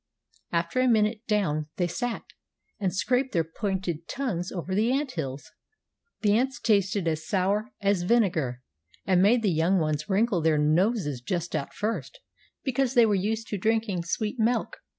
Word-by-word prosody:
After 170 +8 0
a 255 - +3
minute 220 -1 +2
down 160 -9 0
they 180 - +1
sat, 240 +7 -3 0.6
and 190 -3 0
scraped 250 +9 0
their 165 - +2
pointed 175 -1 -3
tongues 200 -10 -3
over 185 0 -4
the 220 +5 +2
ant 275 0 0
hills. 140 - -5 0.7
The 210 -1 +3
ants 260 +3 0
tasted 200 -4 +1
as 155 -1 -2
sour 200 +4 0
as 200 -2 +2
vinegar, 175 - +1 0.4
and 185 -1 +3
made 225 +4 +4
the 200 - +3
young 165 +5 +2
ones 155 -1 -1
wrinkle 200 -2 +2
their 160 -1 +3
noses 155 - +1
just 170 +5 -3
at 140 - -4
first, 230 - -3 0.4
because 265 0 0
they 240 -1 +7
were 215 - +2
used 215 +3 -1
to 205 - -3
drinking 220 -3 0
sweet 210 +7 -2
milk. 230 +1 0
195 Hz, 165 wpm, -27 LUFS, 170-225 Hz, 0.7 s, they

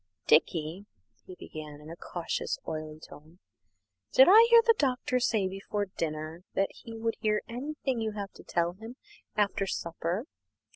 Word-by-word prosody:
"Dickie," 160 +4 +2 0.4
he 185 - -9
began, 150 -4 -9
in 150 +2 -11
a - - -7
cautious, 170 0 -3
oily 155 0 -5
tone, 155 +2 -14 0.7
"did - - +8
I 445 +5 +9
hear 465 -1 +8
the 460 - +7
Doctor 255 -2 +1
say 220 -5 +1
before 195 +2 -3
dinner 155 +1 -4
that 195 - +1
he 230 -3 -11
would 225 0 -2
hear 215 -1 +1
anything 260 0 -3
you 220 -1 -2
have 200 -2 -5
to - - -15
tell 170 0 0
him 225 +6 -10 0.4
after 200 -1 +1
supper? 170 +5 -3
195 Hz, 155 wpm, -29 LUFS, 165-230 Hz, 0.7 s, I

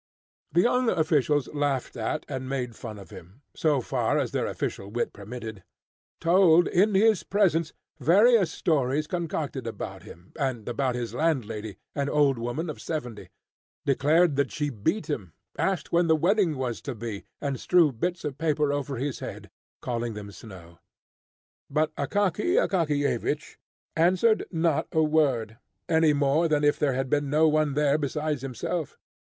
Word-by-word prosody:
The 170 - +4
young 250 +3 +2
officials 150 - +2
laughed 145 -3 -1
at 115 +6 -3
and 130 -2 -5
made 125 -4 -3
fun 110 -4 -8
of 100 - -12
him, 95 - -13
so 150 -4 +1
far - - 0
as - - -1
their - - -1
official 100 - -4
wit 120 +3 -2
permitted; 110 -4 -8 0.6
told 175 0 +5
in 200 +3 +3
his 215 0 +4
presence 170 -6 +1 0.3
various 195 - +5
stories 150 -3 0
concocted 155 -7 -3
about 115 - -6
him, 90 +2 -14
and 130 -6 -2
about 125 +1 -1
his 120 -1 -4
landlady, 110 - -1 0.2
an 140 -1 -1
old 140 -4 +3
woman 120 +8 -3
of 155 - -6
seventy; 125 -9 -5 0.6
declared 150 +3 +3
that 140 -2 +1
she 145 -1 -2
beat 125 - -1
him; 100 - -4 0.2
asked 190 -2 -1
when 170 0 +3
the 160 - +5
wedding 175 -1 +2
was 125 -3 -3
to 135 - -5
be; 110 -2 -6 0.2
and 140 -3 -3
strewed 160 -10 +3
bits 175 +1 -2
of 145 -2 -4
paper 150 -2 +1
over 140 -1 -3
his 130 +2 -3
head, - - -8 0.3
calling 120 -2 -2
them 100 -1 -7
snow. 90 -4 -13 0.9
But 155 0 0
Akaky 205 - 0
Akakiyevich 150 - 0 0.4
answered 185 +7 +3
not 165 -3 0
a 160 - +3
word, 135 -8 +1 0.3
any 160 -2 +4
more 145 +3 +2
than 150 -2 +1
if 145 0 +3
there 145 -3 +2
had 135 +1 -1
been 145 +1 0
no 155 +3 +4
one 155 -2 +2
there 150 0 +2
besides 150 -1 -2
himself. 135 +5 -4
145 Hz, 160 wpm, -26 LUFS, 125-165 Hz, 0.9 s, told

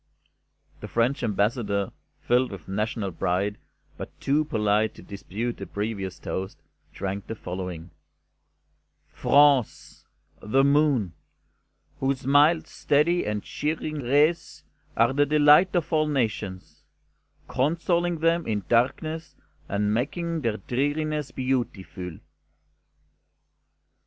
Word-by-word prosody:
The - - -7
French 120 +5 +1
Ambassador, 105 -2 0 0.3
filled 125 +1 +2
with 95 -5 -9
national 105 0 -2
pride, 95 +4 -1 0.4
but - - -9
too 145 +3 +2
polite 110 -4 +1
to - - -13
dispute 105 +4 -5
the 100 - -7
previous 100 -3 -4
toast, 95 +1 -5 0.3
drank 100 0 -5
the 110 - -4
following: 90 -3 -6 1.2
"France' 140 -4 +2 0.3
The 130 +6 +2
Moon, 140 - +3 0.9
whose 135 -1 -1
mild, 145 +4 +4
steady 165 +5 +1
and 105 -1 -2
cheering 155 0 -3
rays 145 +7 +1 0.3
are 115 +3 +4
the 145 +1 +3
delight 150 +5 +5
of 170 -2 -1
all 155 -1 +3
nations, 100 - -3 0.7
consoling 170 +4 0
them 165 +1 +2
in 105 -3 -1
darkness 155 +7 0 0.3
and 105 +1 0
making 165 +7 -2
their 115 -4 -1
dreariness 145 +6 -1
beautiful." 105 -9 -3
125 Hz, 105 wpm, -26 LUFS, 100-150 Hz, 1.2 s, delight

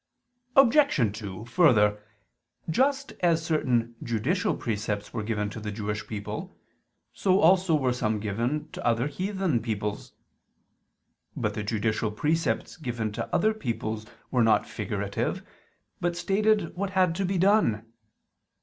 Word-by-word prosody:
Obj. 250 - +4
2: 100 0 -7
Further, 110 - +4 0.7
just 270 - +1
as 165 -2 +2
certain 120 -7 +1
judicial 120 - 0
precepts 105 -2 -3
were 110 - -2
given 105 -1 -1
to 110 - -7
the 105 -1 -5
Jewish 105 0 -4
people, 105 -2 -6 0.6
so 190 0 +2
also 180 -1 +4
were 130 -4 +1
some 110 -3 -1
given 115 +8 -2
to - - -7
other 120 +1 +2
heathen 185 - -1
peoples. 105 -2 -4 1.2
But - - -1
the 105 - -3
judicial 110 +1 -1
precepts 155 +13 -1
given 120 -8 -3
to - - -5
other 220 +1 +3
peoples 110 - -4 0.2
were 125 - +2
not 115 -1 +3
figurative, - - -3 0.6
but 175 0 -1
stated 205 0 +1
what 195 +2 -2
had 185 -3 +4
to 195 - 0
be 190 0 0
done. 180 - +3
125 Hz, 130 wpm, -27 LUFS, 110-180 Hz, 1.2 s, Obj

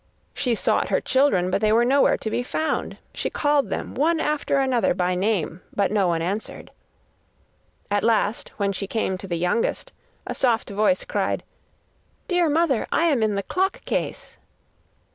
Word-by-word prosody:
She 245 -4 0
sought - - 0
her - - +2
children, 260 -10 +2
but 200 - 0
they 215 -1 +3
were 235 +2 +4
nowhere 275 +3 +4
to 220 - -5
be 245 - 0
found. 315 +5 -2 0.2
She - - -3
called 290 -1 +1
them - - -4
one 320 +4 +1
after 300 -2 0
another 260 -8 +2
by 180 0 0
name, 180 -3 -1
but 200 -1 +1
no 200 -3 +2
one 165 -1 0
answered. 200 +5 -4 1.2
At 205 0 +1
last, 225 -1 +1
when 200 -1 0
she 195 +1 -4
came 210 -3 -1
to 195 - -8
the 170 -2 -2
youngest, 180 - -1 0.3
a - - -3
soft 235 -5 0
voice 215 +7 +1
cried: - - -1 0.8
'Dear 355 -3 +2
mother, 300 -5 +1
I - - +2
am 295 -8 +2
in 215 -2 +1
the 200 - -2
clock 380 - -1
case. - - -4
225 Hz, 170 wpm, -23 LUFS, 200-280 Hz, 1.2 s, were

